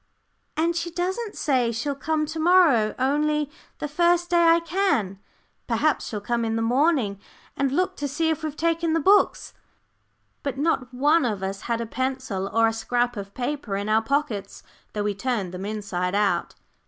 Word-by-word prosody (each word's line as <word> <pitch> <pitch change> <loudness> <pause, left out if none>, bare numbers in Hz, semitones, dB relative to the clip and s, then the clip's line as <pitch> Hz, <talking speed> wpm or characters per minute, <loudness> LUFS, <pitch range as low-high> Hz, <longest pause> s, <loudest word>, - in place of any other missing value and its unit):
"And 335 +2 +1
she 345 +1 -2
doesn't 375 +6 -3
say 255 -5 +1
she'll 240 +6 -2
come 305 +2 -1
to 320 +2 -6
morrow, 315 -11 +4
only 295 +2 +1 0.3
'The 295 - -3
first 345 +3 +2
day 340 -1 +4
I 330 0 +6
can.' 330 - 0 0.5
Perhaps 270 +6 +1
she'll 210 - -4
come 235 +3 -1
in 225 0 -1
the 225 - 0
morning, 250 - +2 0.4
and 275 -1 0
look 365 +6 0
to 290 - -2
see 320 +4 0
if 320 - -2
we've 310 -1 -4
taken 330 0 +1
the 330 - +2
books." 395 +7 +3 0.9
But 275 -2 -3
not 275 -4 0
one 295 +6 +3
of 210 -6 -2
us 195 +1 -3
had 235 0 0
a - - -2
pencil 255 -5 -3
or 230 0 +4
a 225 - 0
scrap 245 +2 0
of 200 -1 -7
paper 250 -5 -3
in 200 +2 -3
our 220 +1 +4
pockets, 225 -6 -2 0.3
though 210 - -2
we 205 0 0
turned 200 -4 -2
them 185 +2 -5
inside 200 -3 -2
out. 200 -4 +1
265 Hz, 180 wpm, -24 LUFS, 215-320 Hz, 0.9 s, I